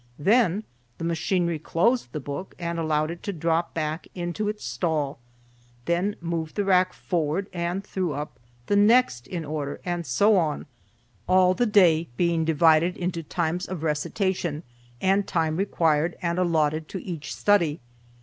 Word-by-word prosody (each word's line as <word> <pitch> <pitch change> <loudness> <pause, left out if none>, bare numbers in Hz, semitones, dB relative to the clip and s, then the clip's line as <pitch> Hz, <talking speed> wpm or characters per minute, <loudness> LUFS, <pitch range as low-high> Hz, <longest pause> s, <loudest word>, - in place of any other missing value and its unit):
Then 210 +2 +3 0.3
the - - -7
machinery 170 0 0
closed 180 - +1
the 150 - -4
book 145 +6 -6
and 170 -1 -3
allowed 155 -1 0
it 170 - -8
to 200 - -3
drop 165 -1 -1
back 155 0 -3
into 180 +4 -2
its 210 0 -5
stall, 150 -6 -1 0.7
then 180 +4 0
moved 165 -2 -3
the 205 - 0
rack 185 -1 +4
forward 170 +2 -1
and 175 +2 -2
threw 185 -5 -2
up 145 -2 -6 0.3
the 205 - +1
next 205 - +4
in 170 -3 -4
order, 145 -1 -4
and 175 -1 -2
so 200 - +3
on, 155 -4 0 0.6
all 185 0 +5
the 240 +5 +1
day 170 -6 +4
being 170 -2 +2
divided 160 +2 +4
according 180 0 -2
to 170 -2 -5
the 155 - -19
times 175 +1 -1
of 180 -4 -5
recitation, 165 +1 -1 0.4
and 195 +1 +2
time 160 -2 0
required 165 -4 +1
and 170 0 -1
allotted 155 -3 +1
to 190 - -6
each 165 -6 -6
study. 170 -7 +2
170 Hz, 160 wpm, -25 LUFS, 155-185 Hz, 0.7 s, all